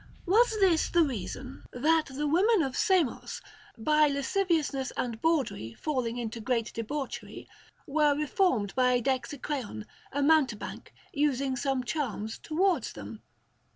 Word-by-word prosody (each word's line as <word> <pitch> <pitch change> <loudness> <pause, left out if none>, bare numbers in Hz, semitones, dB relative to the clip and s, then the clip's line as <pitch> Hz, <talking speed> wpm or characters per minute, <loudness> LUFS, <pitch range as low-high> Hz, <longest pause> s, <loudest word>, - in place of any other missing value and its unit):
Was 440 +4 +3
this 360 -5 +3
the 340 -1 +4
reason, 260 - -5
that 310 +5 +2
the 280 +2 -3
women 365 +6 +3
of 265 -2 -3
Samos, 360 -9 +1 0.4
by 300 +6 +4
lasciviousness 285 -2 0
and 235 -3 -3
bawdry 260 - 0
falling 250 -6 -2
into 230 -1 -4
great 230 -1 -1
debauchery, 270 +5 -5 0.4
were 295 0 +2
reformed 285 - +1
by 250 -1 +3
Dexicreon, 260 - -3 0.3
a 285 +1 0
mountebank, 280 -8 +1 0.2
using 275 -2 +1
some 260 0 -1
charms 235 -6 -3
towards 335 - 0
them? 105 +1 -9
275 Hz, 120 wpm, -29 LUFS, 245-315 Hz, 0.4 s, the